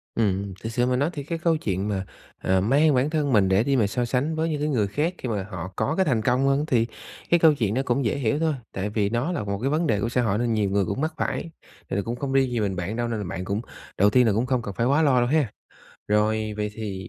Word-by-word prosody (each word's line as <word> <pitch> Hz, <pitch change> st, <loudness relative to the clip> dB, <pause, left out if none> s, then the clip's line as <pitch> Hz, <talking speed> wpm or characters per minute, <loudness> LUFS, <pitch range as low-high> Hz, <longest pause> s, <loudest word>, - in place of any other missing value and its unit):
Ừm, 100 Hz, -3 st, 0 dB
thực 115 Hz, -, -3 dB
sự 120 Hz, +1 st, +1 dB
mà 125 Hz, 0 st, +1 dB
nói 145 Hz, +5 st, +1 dB
thì 145 Hz, -2 st, -5 dB
cái 165 Hz, +3 st, -3 dB
câu 165 Hz, -1 st, +2 dB
chuyện 100 Hz, -, -2 dB
mà, 95 Hz, -1 st, -2 dB, 0.4 s
ờ, 95 Hz, 0 st, +2 dB
mang 145 Hz, +8 st, +4 dB
bản 130 Hz, +4 st, +2 dB
thân 150 Hz, -4 st, 0 dB
mình 95 Hz, -3 st, +4 dB
để 95 Hz, +4 st, +3 dB
đi 140 Hz, 0 st, +1 dB
mà 110 Hz, -5 st, +3 dB
so 120 Hz, +4 st, -1 dB
sánh 135 Hz, +6 st, -1 dB
với 160 Hz, +1 st, 0 dB
những 150 Hz, -2 st, -2 dB
cái 150 Hz, -, 0 dB
người 110 Hz, -8 st, +1 dB
khác 150 Hz, -, -1 dB
khi 125 Hz, -, -5 dB
mà 100 Hz, -3 st, -1 dB
họ 90 Hz, +1 st, -6 dB
có 110 Hz, +8 st, 0 dB
cái 190 Hz, -, +2 dB
thành 120 Hz, -6 st, +1 dB
công 125 Hz, +4 st, +2 dB
hơn, 140 Hz, +2 st, +2 dB
thì 120 Hz, -6 st, +2 dB, 0.4 s
cái 170 Hz, -, +4 dB
câu 160 Hz, -2 st, +6 dB
chuyện 110 Hz, -7 st, -1 dB
nó 130 Hz, -, +1 dB
cũng 125 Hz, +1 st, 0 dB
dễ 110 Hz, -, 0 dB
hiểu 135 Hz, +3 st, 0 dB
thôi, 160 Hz, -2 st, +1 dB, 0.2 s
tại 100 Hz, +2 st, -2 dB
vì 105 Hz, -1 st, 0 dB
nó 120 Hz, +9 st, -1 dB
là 170 Hz, -, -2 dB
một 100 Hz, 0 st, -3 dB
cái 135 Hz, +4 st, 0 dB
vấn 160 Hz, +2 st, +1 dB
đề 105 Hz, -2 st, +1 dB
của 115 Hz, -, 0 dB
xã 125 Hz, 0 st, +1 dB
hội 105 Hz, -3 st, +1 dB
nên 120 Hz, -1 st, 0 dB
nhiều 105 Hz, -3 st, +1 dB
người 100 Hz, -1 st, +1 dB
cũng 130 Hz, -, -3 dB
mắc 160 Hz, +1 st, -1 dB
phải, 165 Hz, -, -2 dB, 0.4 s
thì -, -, -2 dB
là 100 Hz, -, +1 dB
cũng 115 Hz, +4 st, -4 dB
không 135 Hz, +1 st, -3 dB
riêng 135 Hz, -2 st, +3 dB
gì 120 Hz, -, -1 dB
mình 100 Hz, -3 st, -1 dB
bạn 90 Hz, +5 st, -3 dB
đâu, 120 Hz, 0 st, -1 dB
nên 115 Hz, -2 st, -2 dB
là 100 Hz, -, -4 dB
bạn 95 Hz, -1 st, -4 dB
cũng 100 Hz, +4 st, -2 dB, 0.4 s
đầu 100 Hz, +2 st, +5 dB
tiên 125 Hz, +2 st, +4 dB
là 105 Hz, -, +3 dB
cũng 115 Hz, +4 st, +1 dB
không 125 Hz, -1 st, 0 dB
cần 100 Hz, -3 st, -6 dB
phải 115 Hz, -, +1 dB
quá 140 Hz, +5 st, +3 dB
lo 140 Hz, -5 st, +4 dB
đâu 120 Hz, -, +2 dB
ha. 150 Hz, -3 st, +2 dB, 0.6 s
Rồi, 110 Hz, +1 st, +1 dB
vậy 105 Hz, 0 st, -2 dB
thì 100 Hz, -4 st, -6 dB
120 Hz, 300 wpm, -24 LUFS, 105-140 Hz, 0.6 s, câu